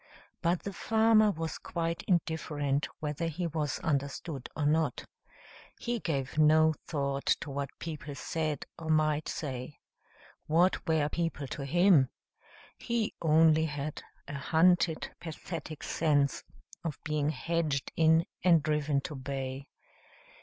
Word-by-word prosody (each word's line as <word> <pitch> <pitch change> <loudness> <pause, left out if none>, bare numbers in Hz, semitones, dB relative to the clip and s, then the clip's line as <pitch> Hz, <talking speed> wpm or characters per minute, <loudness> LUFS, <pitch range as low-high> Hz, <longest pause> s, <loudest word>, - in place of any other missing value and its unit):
But 170 0 +1
the 200 - -4
farmer 220 +1 +4
was 165 -4 -3
quite 170 -1 -3
indifferent 150 -5 0
whether 150 +2 -2
he 170 +2 -3
was 150 -4 -1
understood 140 -1 -2
or 150 - 0
not. 155 +2 +1 0.7
He 240 0 -2
gave 140 -5 -2
no 155 +1 +6
thought 140 -3 -2
to 150 - -5
what 140 0 -3
people 150 -3 -6
said 155 -1 -2
or 160 -1 -6
might 155 -1 +2
say. 130 -1 -5 0.7
What 175 +5 +2
were 160 -3 +2
people 165 -2 -2
to 140 - -5
him? 170 -3 +5 0.7
He 235 -3 -1
only 160 0 +5
had 145 -1 -4 0.3
a 145 -1 -5
hunted, 165 +2 +3
pathetic 160 -1 -7
sense 145 -3 +1 0.4
of 160 -4 -3
being 150 -2 0
hedged 155 -4 -1
in 160 +1 +4 0.2
and 170 -4 +5
driven 150 -2 +1
to 165 - -6
bay. 135 0 -5
155 Hz, 125 wpm, -30 LUFS, 145-165 Hz, 0.7 s, no